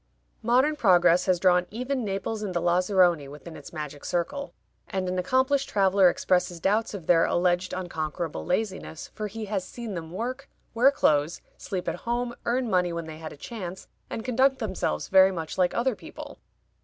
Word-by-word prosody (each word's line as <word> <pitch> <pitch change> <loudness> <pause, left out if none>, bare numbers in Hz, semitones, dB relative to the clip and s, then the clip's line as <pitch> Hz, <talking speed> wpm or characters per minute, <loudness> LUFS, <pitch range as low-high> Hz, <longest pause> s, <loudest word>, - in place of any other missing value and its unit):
Modern 255 +7 +3
progress 180 - +4
has 180 -2 +3
drawn 180 -1 +3
even 250 +3 -3
Naples 200 +2 -3
and 195 -4 -4
the - - +2
Lazaroni 175 -3 +3
within 150 +4 -10
its - - -11
magic 150 -3 -7
circle, 230 +12 -2 0.4
and 190 -1 -2
an 180 0 -1
accomplished 260 +8 +1
traveler 195 -2 +4
expresses 180 -1 0
doubts 210 +5 +1
of 180 -5 -8
their 165 -1 +5
alleged 180 +1 +1
unconquerable 170 -2 -4
laziness, 190 -4 -3
for 215 -1 -4
he 220 +1 -6
has 200 -2 -2
seen 230 +2 -7
them 165 -3 -6
work, 250 +9 -5 0.2
wear 240 +4 +6
clothes, 155 - +1 0.2
sleep 185 -3 -5
at - - -1
home, 240 +1 -2
earn 245 +1 +1
money 180 -4 +2
when 170 -1 -4
they 160 0 -9
had 160 -1 -7
a - - -11
chance, 190 +1 -7 0.2
and 225 - -5
conduct 260 +2 +3
themselves 190 - -2
very 190 0 +6
much 165 -4 -5
like 180 -1 +2
other 240 0 +1
people. - - -10
190 Hz, 180 wpm, -26 LUFS, 175-230 Hz, 0.4 s, wear